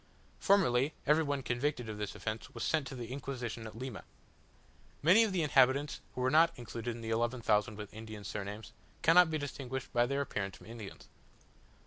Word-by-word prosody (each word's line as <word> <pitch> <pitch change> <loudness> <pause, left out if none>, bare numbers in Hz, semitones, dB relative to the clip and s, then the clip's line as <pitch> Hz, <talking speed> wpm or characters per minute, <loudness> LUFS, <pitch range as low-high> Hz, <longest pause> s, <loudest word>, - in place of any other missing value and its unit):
Formerly, 150 -8 +3
every 150 +2 +4
one 140 -2 -2
convicted 125 0 -1
of 105 -1 -6
this 105 - -4
offence 110 0 -4
was - - -4
sent 155 -4 +1
to 135 - -7
the 120 -1 -6
Inquisition 125 -4 -5
at 110 - -10
Lima. 125 -4 -6 1.0
Many 185 +9 +7
of 220 - 0
the 180 -3 +1
inhabitants 140 0 +3
who 125 - -2
are 130 - +2
not 165 +2 +5
included 120 0 -5
in 120 - -9
the 115 0 -4
eleven 120 +2 0
thousand 105 0 +2
with 105 -2 -8
Indian 110 -1 -8
surnames, 100 +2 -6 0.3
cannot 170 +1 +7
be 160 - 0
distinguished 130 -3 -5
by 120 0 +3
their 140 +2 0
appearance 100 -8 -3
from - - -16
Indians. 110 -3 -9
125 Hz, 185 wpm, -33 LUFS, 110-145 Hz, 1.0 s, Many